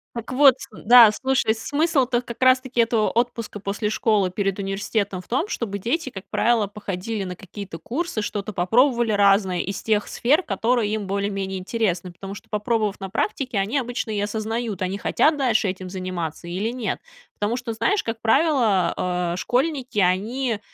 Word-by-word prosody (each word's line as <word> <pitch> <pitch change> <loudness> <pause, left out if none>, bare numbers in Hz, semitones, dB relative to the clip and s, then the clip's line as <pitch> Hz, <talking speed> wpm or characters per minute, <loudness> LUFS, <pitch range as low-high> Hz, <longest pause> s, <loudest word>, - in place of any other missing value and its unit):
Так 235 0 -6
вот 270 -1 +7
ц - - -8
э, - - -12
м. - - -15
Да, 240 -2 +10
слушай, 260 -1 +1
смысл-то 270 -1 +1
как 235 -1 -9
раз 255 0 +6
таки 255 -2 0
этого 230 -2 +2
отпуска 230 -3 -2
после 205 +2 -2
школы 210 -3 +1
перед 195 +1 -2
университетом 195 0 -2
в - - -22
том, 270 - 0
чтобы 205 - -3
дети, 265 - -1
как 195 -5 -9
правило, 230 -3 +2
походили 205 +1 -4
на 180 -1 -5
какие-то 195 -1 -9
курсы. 265 - -3
Что-то 205 0 -4
попробовали 235 +6 +2
разное 195 -2 +3
из 195 +2 -3
тех 210 -2 0
сфер, 295 +9 +2
которые 225 - 0
им 210 -2 -3
более-менее 195 -1 -2
интересны. 185 -3 -2
Потому 195 +3 -8
что - - -13
попробовав 210 -1 -1
на 195 -1 -6
практике, 225 +4 -2
они 200 +8 0
обычно 245 -3 -3
и 210 - -1
осознают, 220 0 -3
они 185 +1 -1
хотят 300 +8 +2
дальше 240 -6 +2
этим 185 0 -6
заниматься 180 -3 -5
или 195 +6 -2
нет. 240 -5 -3 0.4
Потому 210 +3 0
что, 250 -2 -4
знаешь, 300 - +1
как 225 0 -4
правило, 225 - +3 0.4
э, - - -3
школьники, 260 - -1
они, 215 +6 +1
215 Hz, 175 wpm, -23 LUFS, 195-245 Hz, 0.4 s, Да